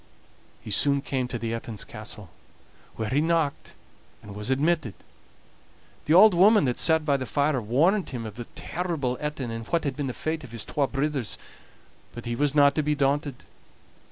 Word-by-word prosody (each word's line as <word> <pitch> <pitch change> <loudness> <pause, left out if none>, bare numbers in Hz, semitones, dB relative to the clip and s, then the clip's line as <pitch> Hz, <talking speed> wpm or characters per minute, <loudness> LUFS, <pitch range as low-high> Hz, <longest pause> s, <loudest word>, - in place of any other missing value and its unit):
He 110 - -8
soon 140 +6 +3
came 130 -3 -2
to 125 - -4
the 115 0 -3
Etin's 115 -2 -5
castle, 105 -4 -8 0.6
where 110 -1 -3
he 140 +3 +2
knocked, 160 -3 -1 0.5
and 100 - -10
was 105 +3 -5
admitted. 140 - +1 1.1
The 155 - +3
auld 210 +2 +8
woman 200 +1 +5
that 125 -2 -1
sat 160 -1 +3
by 140 -2 +2
the 130 -2 -5
fire 140 +2 +1
warned 160 - +2
him 120 -4 -5
of 110 - -6
the 120 +2 -7
terrible 160 -8 -2
Etin, 150 -5 -3
and 115 0 -6
what 170 -1 0
had 140 - -2
been 145 -2 -3
the 125 - -3
fate 155 +3 -3
of 130 - -10
the 115 - -8
twa 140 +5 -1
brithers; 140 -3 -2 0.8
but 120 - -8
he 120 0 -2
was 145 +3 0
not 145 -1 +6
to 155 - +1
be 150 0 0
daunted. 140 -1 -1
140 Hz, 185 wpm, -26 LUFS, 120-155 Hz, 1.1 s, auld